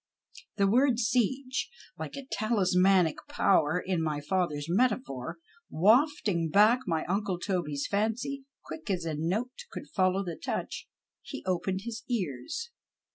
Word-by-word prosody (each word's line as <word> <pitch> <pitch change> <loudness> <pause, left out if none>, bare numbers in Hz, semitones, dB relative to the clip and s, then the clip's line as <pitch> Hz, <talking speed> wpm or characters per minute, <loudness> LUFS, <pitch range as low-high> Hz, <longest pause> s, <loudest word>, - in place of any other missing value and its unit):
The 200 - +4
word 245 +4 +4
siege, 255 +3 0 0.3
like - - -6
a 275 - -7
talismanic 190 -5 +3
power, 155 +4 +3
in 180 -2 -1
my 155 -2 -1
father's 150 -2 -1
metaphor, 175 - 0 0.3
wafting 210 - +3
back 210 +8 +5
my 160 -3 0
uncle 195 0 -1
Toby's 170 -7 -2
fancy, 225 +7 -1 0.2
quick 320 -8 -8
as 180 -4 -1
a 160 - -2
note 185 +11 -1 0.2
could - - -8
follow 185 0 +2
the 170 -2 -4
touch, - - -3 0.3
he - - -8
opened 185 +1 -1
his 230 0 -6
ears. 205 - -3
195 Hz, 130 wpm, -29 LUFS, 170-235 Hz, 0.3 s, back